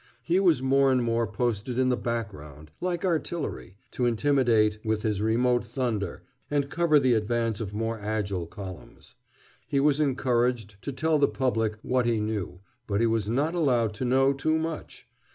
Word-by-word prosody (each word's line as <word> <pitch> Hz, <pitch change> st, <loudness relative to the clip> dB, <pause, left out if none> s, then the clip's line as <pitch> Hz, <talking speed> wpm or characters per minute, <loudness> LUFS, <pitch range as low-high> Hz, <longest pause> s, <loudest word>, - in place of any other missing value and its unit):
He 175 Hz, +2 st, +2 dB
was 170 Hz, -9 st, +3 dB
more 135 Hz, 0 st, +4 dB
and 130 Hz, -2 st, +2 dB
more 115 Hz, 0 st, +1 dB
posted 115 Hz, +2 st, -2 dB
in 130 Hz, 0 st, +3 dB
the 125 Hz, -, +3 dB
background, 80 Hz, -, -5 dB
like 175 Hz, 0 st, -1 dB
artillery, 165 Hz, -, -3 dB
to 125 Hz, -, 0 dB
intimidate 115 Hz, -4 st, +2 dB
with 110 Hz, -1 st, -1 dB
his 105 Hz, -2 st, 0 dB
remote 120 Hz, +3 st, +2 dB
thunder 115 Hz, -6 st, -3 dB, 0.3 s
and 145 Hz, -1 st, 0 dB
cover 170 Hz, -2 st, +3 dB
the 130 Hz, -3 st, +3 dB
advance 115 Hz, 0 st, 0 dB
of 100 Hz, -3 st, -4 dB
more 115 Hz, +1 st, -2 dB
agile 100 Hz, -4 st, -2 dB
columns. 95 Hz, 0 st, -10 dB, 0.5 s
He 140 Hz, -, +1 dB
was 145 Hz, +1 st, +3 dB
encouraged 125 Hz, -7 st, 0 dB
to 140 Hz, -, -4 dB
tell 155 Hz, +3 st, +1 dB
the 140 Hz, -, +5 dB
public 110 Hz, -5 st, -1 dB
what 125 Hz, -1 st, +1 dB
he 115 Hz, -2 st, +1 dB
knew, 105 Hz, -4 st, -3 dB, 0.3 s
but 100 Hz, -1 st, 0 dB
he 115 Hz, -, +3 dB
was 110 Hz, -2 st, 0 dB
not 145 Hz, +8 st, 0 dB
allowed 125 Hz, -10 st, +1 dB
to 110 Hz, -, -5 dB
know 135 Hz, +2 st, +3 dB
too 155 Hz, +3 st, 0 dB
much. 160 Hz, 0 st, -5 dB
120 Hz, 170 wpm, -27 LUFS, 110-135 Hz, 0.5 s, the